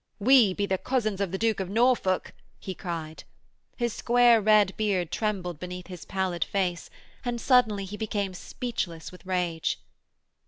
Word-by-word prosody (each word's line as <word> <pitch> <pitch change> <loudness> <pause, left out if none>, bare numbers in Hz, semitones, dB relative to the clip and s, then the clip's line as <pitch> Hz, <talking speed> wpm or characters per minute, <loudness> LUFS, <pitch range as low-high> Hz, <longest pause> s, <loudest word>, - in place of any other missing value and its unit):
'We 225 -3 +5
be 205 - 0
the 190 -2 -1
cousins 215 -6 -1
of 195 -3 -1
the 190 - -2
Duke 225 0 +1
of 190 -2 -3
Norfolk,' 225 -4 +2 0.3
he 190 - -5
cried. 165 -4 -6 0.5
His 235 -3 -1
square 240 -1 +4
red 210 -2 +4
beard 195 -6 0
trembled 185 -7 -2
beneath 180 0 -6
his 180 -3 -9
pallid 190 -3 -1
face, 180 -3 -2 0.3
and 240 -1 -2
suddenly 225 -6 +3
he 205 +2 -7
became 205 -3 -2
speechless 180 -5 -5
with 180 - -14
rage. 175 -3 -1
195 Hz, 155 wpm, -27 LUFS, 180-225 Hz, 0.5 s, We